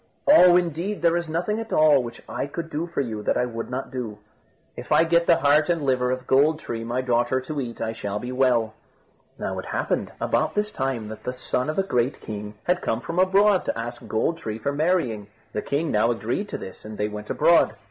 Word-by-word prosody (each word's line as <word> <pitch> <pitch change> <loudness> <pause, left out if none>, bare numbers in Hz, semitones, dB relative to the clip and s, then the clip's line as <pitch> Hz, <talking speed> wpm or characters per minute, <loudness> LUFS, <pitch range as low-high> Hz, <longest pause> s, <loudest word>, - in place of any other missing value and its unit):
"Oh! 180 - +8
indeed 175 +3 -2
there 170 0 +4
is 170 -2 -2
nothing 180 +7 -1
at 225 0 -6
all 150 -3 +5
which 120 -1 -8
I - - -3
could 165 +3 -6
do 155 +3 -2
for 170 - -2
you 110 -5 -4
that - - 0
I 125 - +2
would 115 -1 -5
not 130 +2 -4
do." 120 -5 -5 0.6
"If - - -9
I - - +6
get 170 0 +2
the 170 - +6
heart 145 +4 +3
and 170 -2 +1
the - - -3
liver 125 -2 +1
of 130 0 -2
Gold 150 +4 +3
tree, 115 -1 -5
my 120 +2 -1
daughter, 120 0 +1
to 145 +2 -4
eat, 120 -2 -6
I 110 0 -2
shall 105 -2 -4
be 125 +4 -5
well." 125 -4 +2 0.6
Now - - -3
it - - -7
happened - - -2
about - - 0
this 210 0 0
time 130 -5 -2
that 110 - -9
the 125 - -3
son 125 +1 -2
of 155 - -3
a 195 - +3
great 125 -7 0
king 105 0 -7
had 180 +1 +1
come 110 - -1
from 165 +5 -3
abroad 195 +1 +4
to - - -2
ask 120 +1 -6
Gold 165 +9 0
tree 110 -5 -4
for 140 +6 -2
marrying. 145 - 0 0.3
The 105 - -1
king 150 +3 -1
now 110 +2 +3
agreed 120 - -2
to - - -4
this, 95 - -9
and 110 0 -8
they 105 - 0
went 105 0 -8
abroad. - - +4
130 Hz, 235 wpm, -24 LUFS, 115-165 Hz, 0.6 s, Oh